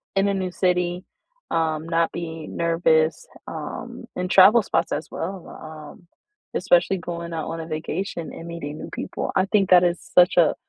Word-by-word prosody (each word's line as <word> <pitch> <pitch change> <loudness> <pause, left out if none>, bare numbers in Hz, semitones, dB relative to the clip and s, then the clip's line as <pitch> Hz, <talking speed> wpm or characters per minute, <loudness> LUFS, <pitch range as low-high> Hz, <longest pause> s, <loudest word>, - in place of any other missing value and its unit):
in 195 +1 +3
a - - +1
new 185 -2 -2
city, 180 0 0 0.5
um, 160 -1 0
not 165 0 +1
be 160 -2 -6
nervous, 165 -2 +1 0.2
um, - - -7
and 180 0 -3
travel 210 +4 +8
spots - - 0
as - - -3
well, 185 +1 -5
um, 155 +2 -11 0.5
especially - - +3
going 170 -1 -6
out 160 -2 -3
on 165 0 -4
a 160 - -6
vacation 165 +2 -4
and 165 - -9
meeting 155 -3 -6
new - - -7
people. - - -4
I 185 - +3
think 195 -1 +2
that 180 -1 +7
is 175 -1 +1
such 180 0 +4
a 170 -3 +5
170 Hz, 175 wpm, -23 LUFS, 160-185 Hz, 0.5 s, travel